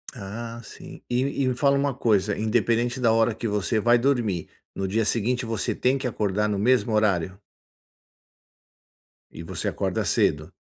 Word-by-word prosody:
Ah 115 +3 -7
sim, - - -12
e 135 +3 0
e - - +1
me - - 0
fala 140 +1 +3
uma 140 -1 0
coisa, 105 -5 +1
independente 115 +2 +1
da 115 -3 +3
hora 115 0 +2
que 115 - -7
você 105 +2 -1
vai 120 +3 +4
dormir, 115 - 0 0.3
no 95 0 -3
dia 110 +4 0
seguinte 120 +3 0
você 115 -2 -2
tem 130 +2 +1
que 130 -1 -3
acordar 105 -2 -1
no 105 -2 -1
mesmo 110 0 +2
horário? 95 -4 +1 1.9
E 85 - -9
você - - -4
acorda - - -1
cedo? 75 +4 +1
115 Hz, 165 wpm, -25 LUFS, 100-120 Hz, 1.9 s, vai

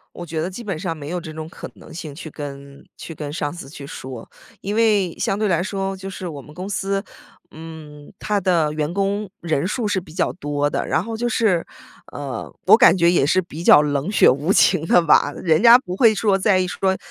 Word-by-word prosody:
我 175 - -7
觉 160 -1 -4
得 165 - -2
基 190 +6 -8
本 195 -7 -4
上 165 -1 -4
没 145 -2 -8
有 175 +2 -3
这 160 -2 -8
种 155 0 -7
可 170 - -9
能 - - -15
性 160 -3 -7
去 160 +1 -9
跟 140 -1 -9
去 165 - -9
跟 145 -1 -6
上 145 -2 -3
司 170 -6 -9
去 145 -1 -10
说， 130 -3 -9 0.3
因 200 - -4
为 210 -6 +2
相 195 - 0
对 215 0 0
来 170 -4 +1
说， 195 +1 -3
就 190 +1 -8
是 190 -1 -6
我 150 -4 -7
们 150 +2 -15
公 185 +3 -6
司， 195 0 -2 0.5
嗯， 155 -2 -11
它 210 -1 0
的 170 -5 +1
员 155 +2 -3
工 200 +1 -1
人 160 -2 -1
数 215 +2 -2
是 200 -2 0
比 165 -3 -15
较 - - -1
多 145 -3 -2
的， - - -2
然 - - 0
后 225 +3 -5
就 240 +2 -1
是， 210 -7 +1 0.5
呃， - - -6 0.2
我 - - +8
感 - - +6
觉 170 -1 +4
也 170 -6 +2
是 185 +5 +2
比 170 -1 -9
较 150 - +7
冷 145 +2 -1
血 - - +6
无 145 +8 0
情 165 -3 +3
的 175 - +5
吧， 150 -2 +4
人 160 +1 +1
家 235 +2 +9
不 185 -8 -7
会 225 0 +5
说 200 -1 +1
在 190 -1 +3
意 185 - -1
说 190 +1 0
175 Hz, 250 characters per minute, -21 LUFS, 150-195 Hz, 0.5 s, 家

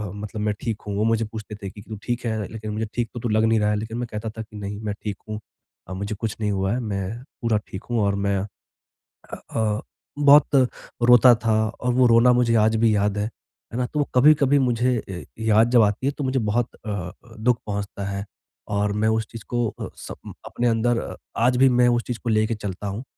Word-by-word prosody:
मतलब 105 +1 -6
मैं 105 0 +1
ठीक 115 -3 -3
हूँ, 100 - -2
वो 105 - +1
मुझे 115 0 +2
पूछते 110 -1 -8
थे 100 - -3
कि 105 +1 -12
तू 110 - -5
ठीक 120 0 -3
है? 110 -3 -2
लेकिन 110 -1 -6
मुझे 110 +1 -2
ठीक 120 -1 -1
तो 120 - -5
तू 120 - -2
लग 110 +1 +2
नहीं 110 -1 +3
रहा 105 - +2
है - - +1
लेकिन 110 +2 -5
मैं 120 0 -3
कहता 105 +1 -4
था 110 +1 -7
कि 105 -1 -13
नहीं 100 0 -5
मैं 105 -1 -2
ठीक 105 -2 -3
हूँ 105 0 -4 0.5
अ, 95 - -5
मुझे 100 +3 -4
कुछ 110 0 -3
नहीं 105 -1 +1
हुआ 95 0 0
है 125 - -1
मैं 105 +1 -4 0.2
पूरा 115 -3 +2
ठीक 95 +3 -7
हूँ 120 - +1
और 100 0 +1
मैं 100 -1 +1 0.7
अ - - -12 0.2
अ, 110 -1 0 0.4
बहुत 145 0 +6 0.5
रोता 120 0 +8
था 110 - +3 0.3
और 125 0 +1
वो 125 -1 +5
रोना 120 +1 +6
मुझे 120 -1 +3
आज 110 +1 +3
भी 110 -1 +3
याद 105 0 +1
है, 105 - 0 0.5
है 120 - -3
ना? 125 - +1
तो 150 - -3
वो 145 - +2
कभी-कभी 145 +1 +5
मुझे 125 -1 +2 0.2
ए 90 -2 -6
याद 110 +1 +4
जब 120 -2 +6
आती 105 +5 0
है 140 - +2
तो 145 - -3
मुझे 130 0 +1
बहुत 115 +1 0 0.2
अ - - -4
अ, 90 -4 -3 0.3
दुःख 120 +2 +2
पहुँचता 100 -1 -4
है 100 0 -4 0.5
और 100 0 +1
मैं 110 - +3
उस 110 0 0
चीज़ 115 -2 -8
को 120 -1 +1
अ, - - -4
स - - -9 0.3
अपने 120 - -1
अंदर 115 +1 0 0.2
आज 125 +2 +3
भी 135 +1 +6
मैं 125 - +6
उस 120 0 +1
चीज़ 120 -2 -3
को 120 - -1
लेके 110 +1 +2
चलता 100 -1 -5
हूँ। 100 +5 -4
110 Hz, 240 wpm, -23 LUFS, 105-120 Hz, 0.7 s, रोता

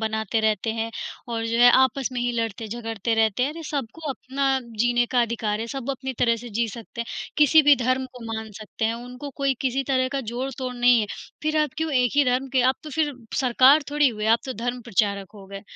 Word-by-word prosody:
बनाते 220 0 -1
रहते 220 +1 +1
हैं 225 0 -3 0.4
और 230 -1 -2
जो 230 +1 -1
है, 245 0 +8
आपस 260 +1 +3
में 245 - -2
ही 245 0 0
लड़ते-झगड़ते 225 0 -3
रहते 225 +1 +2
हैं। 275 - +1
अरे, 330 +2 -8
सबको 290 +3 -4
अपना 270 +1 -1 0.2
जीने 240 0 +3
का 245 - +4
अधिकार 220 -2 -2
है, 225 - -3
सब 270 +1 -4
अपनी 265 0 -4
तरह 230 -1 +3
से 240 +2 -9
जी 235 - +2
सकते 230 +2 -8
हैं, 235 - -4 0.3
किसी 305 +1 +6
भी 290 0 +6
धर्म 255 +1 0
को 235 - -9
मान 220 0 -5
सकते 215 +1 -5
हैं। 225 +1 +1
उनको 250 +4 -8
कोई 275 -1 +1
किसी 265 +1 0
तरह 255 -1 +2
का 275 - -1
जोड़-तोड़ 255 0 -4
नहीं 245 -1 +5
है, 210 - -1 0.4
फिर 310 0 0
आप 300 -2 0
क्यों 320 -1 -2
एक 250 -2 +3
ही 290 - +5
धर्म 255 +2 0
के 260 - +3
आप 265 - +2
तो 305 - -7
फिर 295 0 0 0.3
सरकार 260 +4 +5
थोड़ी 295 -1 +4
हुए, 215 -3 -4
आप 225 +1 +5
तो 260 - -3
धर्म 245 +3 -3
प्रचारक 200 -3 0
हो 200 -2 -12
गए, 195 0 -8
245 Hz, 230 wpm, -24 LUFS, 225-270 Hz, 0.4 s, है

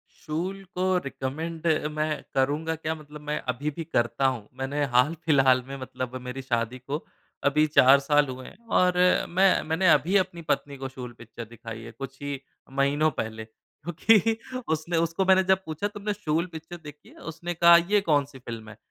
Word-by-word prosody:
शूल 185 +6 -4
को 185 0 +2
रिकमेंड 160 +2 -4 0.2
मैं 155 0 -1 0.3
करूँगा 145 +5 +1
क्या, 160 0 -3
मतलब 150 -1 -12
मैं 150 0 -3
अभी 145 +5 -3
भी 165 +3 -6
करता 120 -4 0
हूँ। 120 -6 -3
मैंने 140 +2 -1
हाल 125 +6 +5
फिलहाल 135 -4 +4
में, 135 - -6
मतलब 130 -1 -6
मेरी 125 +2 -6
शादी 120 -1 -1
को 145 +3 -3 0.4
अभी 150 +2 +4
4 140 -2 +6
साल 145 +1 +3
हुए 130 0 -7
हैं, - - -13
और 180 0 +4 0.4
मै 185 +2 +4
मैंने 165 +4 +1
अभी 175 +4 +3
अपनी 185 -3 -1
पत्नी 145 -3 -2
को 135 0 -5
शूल 125 -2 -8
पिक्चर 115 0 -9
दिखाई 115 0 -9
है, 115 - -9
कुछ 135 +3 -8
ही 145 -1 -4 0.4
महीनों 145 +3 +3
पहले, 110 0 -4
क्योंकि 205 - +1 0.4
उसने 160 +2 -2
उसको 165 +3 0
मैंने 190 0 +5
जब 190 0 +2
पूछा, 160 +6 -2
"तुमने 205 0 -4
शूल 170 -5 -1
पिक्चर 160 +2 -8
देखी 150 0 -12
है?" - - -18 0.2
उसने 170 +2 -5
कहा, 170 0 +7
"ये 195 +5 +2
कौन 145 -2 +4
सी 135 -1 -14
फिल्म 115 -3 -8
है?" 105 - -12
150 Hz, 185 wpm, -26 LUFS, 130-170 Hz, 0.4 s, कहा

